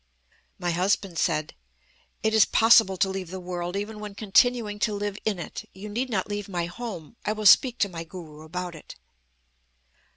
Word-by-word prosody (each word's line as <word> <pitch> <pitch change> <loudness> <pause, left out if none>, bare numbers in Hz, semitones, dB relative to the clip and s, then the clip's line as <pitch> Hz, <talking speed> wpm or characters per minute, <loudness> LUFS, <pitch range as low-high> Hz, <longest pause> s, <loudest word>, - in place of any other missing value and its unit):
"My 175 -1 -1
husband 180 0 0
said: 155 -2 0 0.7
'It 220 0 +2
is 220 -1 +7
possible 225 -4 +5
to 190 - +3
leave 190 -2 -4
the 190 +1 -6
world, 175 0 -4
even 210 +2 -4
when 210 -1 -7
continuing 215 0 +2
to 215 -1 0
live 205 0 -3
in 215 -3 0
it. 175 - -7
You 200 +3 -8
need 245 +5 -2
not 195 -5 -1
leave 205 -1 -4
my 175 -3 -1
home. 195 0 -7
I 210 - 0
will 215 0 -5
speak 245 +4 +7
to 205 - +4
my 170 -3 -6
Guru 160 -3 -11
about 175 +3 -5
it.' 155 - -11
195 Hz, 185 wpm, -26 LUFS, 175-215 Hz, 0.7 s, is